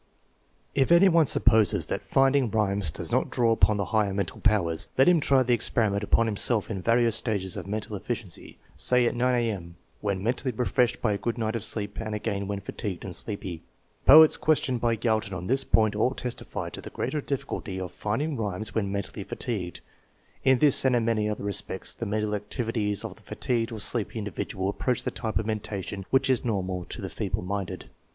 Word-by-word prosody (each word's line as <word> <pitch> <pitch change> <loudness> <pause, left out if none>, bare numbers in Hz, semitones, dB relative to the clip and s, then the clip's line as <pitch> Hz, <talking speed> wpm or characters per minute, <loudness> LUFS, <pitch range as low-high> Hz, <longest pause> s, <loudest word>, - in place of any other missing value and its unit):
If 135 +3 +2
any 175 +3 +7
one 165 -4 +4
supposes 110 -6 +3
that - - -3
rinding 135 -2 +4
rhymes 100 -5 0
does - - -4
not - - +1
draw 115 -2 +2
upon 110 -2 +3
the 100 - -1
higher 105 -3 +2
mental 100 -3 -3
powers, 95 -7 +2
let 135 - +5
him 175 -2 +6
try 135 -3 +3
the 125 0 +2
experiment 110 -3 +1
upon 115 +2 +3
himself 110 0 0
in 95 -4 -3
various 115 +1 +3
stages 100 -6 -1
of - - -6
mental 105 +1 -4
efficiency, 105 -2 -6 0.2
say 125 -1 +4
at - - +1
9 125 +1 +2
A.M., 100 -8 -2 0.2
when 100 -2 -2
mentally 125 +3 0
refreshed 125 -1 +1
by 105 -3 +2
a 100 - -3
good 120 0 -2
night 110 -1 -1
of 115 - -3
sleep 105 -2 -4
and 110 -1 -4
again 100 -2 -3
when 100 0 -3
fatigued 100 -2 -5
and 90 -3 -3
sleepy. 95 -6 -4 0.5
Poets 155 +3 +9
questioned 135 -6 +1
by 115 -1 +2
Galton 110 -4 -1
on 90 0 -5
this 135 +6 +1
point 110 -1 +2
all 125 +5 +1
testified 125 -1 -5
to - - -6
the - - -8
greater 150 - -3
difficulty 115 -8 -4
of 90 -2 -5
finding 115 - -2
rhymes 105 -3 -4
when 100 -3 -1
mentally 100 0 -4
fatigued. 95 -6 -4 0.6
In 130 -1 +5
this 145 0 +5
and 130 -2 +3
in 115 -2 +1
manyjother 105 -2 0
respects 100 -1 -2
the 115 - -5
mental 105 0 -1
activities 105 0 -2
of - - -7
the - - -18
fatigued 115 -2 -2
or 110 - -6
'sleepy 115 +1 -2
in 105 - -3
dividual 95 -1 -3
approach 125 +5 -1
the - - -2
type 110 -2 -3
of 110 - 0
mentation 100 -3 -4
which 135 0 +3
is 130 -3 +2
normal 95 -6 -2
to - - -6
the - - -2
feeble - - -3
minded. 95 0 -4
110 Hz, 200 wpm, -27 LUFS, 100-120 Hz, 0.6 s, Poets